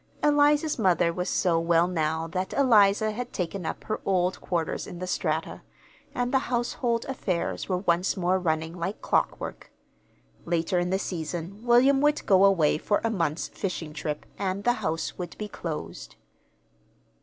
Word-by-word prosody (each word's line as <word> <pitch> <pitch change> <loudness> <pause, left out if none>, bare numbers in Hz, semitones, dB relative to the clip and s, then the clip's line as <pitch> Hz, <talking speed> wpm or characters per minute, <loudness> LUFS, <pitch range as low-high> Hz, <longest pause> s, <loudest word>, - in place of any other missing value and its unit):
Eliza's 295 0 +3
mother 175 -4 +3
was 180 +2 -2
so 170 -4 +2
well 165 0 +3
now 160 -2 -1
that 185 +3 -3
Eliza 215 -5 +4
had 245 +3 -5
taken 180 -1 -3
up - - -5
her 215 - -3
old 185 -1 0
quarters 170 -3 -2
in 175 - -8
the 185 - -4
Strata, 160 -3 -2 0.5
and 245 +1 -1
the 265 - +5
household 240 -1 -1
affairs 200 -12 -3
were 185 - +1
once 180 +1 +1
more 185 +1 +1
running 160 -1 -1
like 190 +5 -4
clockwork. - - -1 0.7
Later 170 +1 0
in 175 0 -1
the 190 - +1
season 175 +3 -5
William 255 +3 +5
would 295 0 +2
go 190 -1 +5
away 170 -7 +3
for 205 - +1
a 230 - +1
month's 165 -6 -1
fishing 170 -6 -4
trip, 150 -1 -4
and 195 0 -2
the 245 - +3
house 165 -2 -3
would 175 -2 -6
be 210 - -4
closed. 165 -6 -6
185 Hz, 160 wpm, -27 LUFS, 170-220 Hz, 0.7 s, the